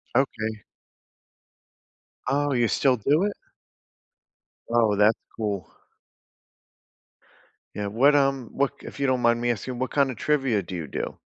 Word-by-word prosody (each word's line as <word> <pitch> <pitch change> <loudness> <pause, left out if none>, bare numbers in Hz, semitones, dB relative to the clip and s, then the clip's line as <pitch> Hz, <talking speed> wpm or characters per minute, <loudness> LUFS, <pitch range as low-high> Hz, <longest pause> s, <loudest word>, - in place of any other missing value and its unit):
Okay. 110 -5 0 1.6
Oh, 145 0 +1
you 120 -2 +2
still 130 0 +2
do 145 - +2
it? 205 0 0 1.3
Oh, 115 -3 +3
that's 105 +2 +4 0.2
cool. 100 -6 -2 2.1
Yeah, 105 - -3
what, 130 +8 +4
um 135 -3 +1
what 140 0 -1
k - - -11
if - - -9
you 140 - +1
don't 130 -2 +1
mind 120 0 +3
me 120 0 +2
asking, 120 +3 -4
what 130 +1 -3
kinda 135 -4 +2
trivia 135 -6 +1
do 90 - -7
you 80 -4 -5
do? - - -5
120 Hz, 140 wpm, -25 LUFS, 110-140 Hz, 2.1 s, that's